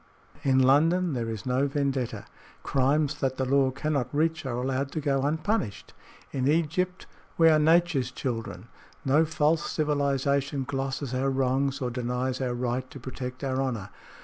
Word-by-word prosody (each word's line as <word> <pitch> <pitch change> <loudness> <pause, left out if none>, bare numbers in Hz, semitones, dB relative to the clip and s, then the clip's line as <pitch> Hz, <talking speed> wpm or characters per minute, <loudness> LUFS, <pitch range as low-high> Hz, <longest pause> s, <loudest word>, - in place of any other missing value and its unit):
"In 135 -1 +2
London 160 +6 +4
there 115 -3 -2
is 110 -3 -5
no 130 +2 +1
vendetta. 135 -3 -2 0.4
Crimes 145 +2 +1
that 130 -2 -1
the 130 - 0
law 135 0 +3
cannot 140 -1 -1
reach 155 0 0
are 120 -2 -2
allowed 135 +2 -1
to 160 - -1
go 140 -2 +1
unpunished. 150 - -1 0.4
In 130 -1 -1
Egypt 170 +4 0 0.3
we 165 -1 +6
are 155 -1 +5
Nature's 160 -4 +3
children. 115 -6 -5 0.4
No 145 +4 +4
false 155 0 +1
civilization 140 -2 0
glosses 135 -1 -3
our 130 +2 +1
wrongs 135 +1 0
or 125 -1 -1
denies 125 +2 -2
our 125 -2 -1
right 125 +1 -2
to 140 - -10
protect 130 +1 -6
our 130 -1 0
honor. 120 -8 -3
135 Hz, 155 wpm, -27 LUFS, 130-150 Hz, 0.4 s, we